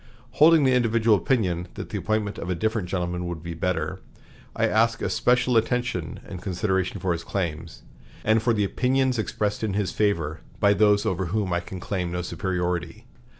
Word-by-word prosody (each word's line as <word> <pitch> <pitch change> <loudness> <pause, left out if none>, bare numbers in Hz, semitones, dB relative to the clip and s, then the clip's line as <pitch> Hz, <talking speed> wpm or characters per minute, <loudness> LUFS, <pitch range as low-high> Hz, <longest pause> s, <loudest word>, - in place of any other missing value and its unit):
Holding 160 0 +6
the 130 -1 +4
individual 115 -2 +3
opinion 90 -5 0
that - - -6
the - - -3
appointment 110 -2 -1
of 85 - -5
a 90 - 0
different 110 0 -1
gentleman 90 -1 -2
would 85 -2 -5
be 85 0 -5
better, 85 +1 -2 0.6
I - - +2
ask 115 +1 +2
especial 125 -1 +2
attention 115 -7 -1
and 95 -3 -7
consideration 95 0 -1
for 95 - -1
his 85 - -5
claims, 85 -4 -4 0.4
and 110 +1 +4
for 120 +1 +2
the 105 -2 +1
opinions 130 +4 +1
expressed 105 -1 -2
in 105 -3 -1
his 105 -2 0
favor 85 -7 0 0.2
by 100 0 +5
those 105 0 +3
over 95 0 0
whom 95 -1 -1
I 85 - +2
can 90 +1 -8
claim 90 -2 -3
no 90 0 -2
superiority." 90 +5 -3
100 Hz, 180 wpm, -25 LUFS, 90-110 Hz, 0.6 s, Holding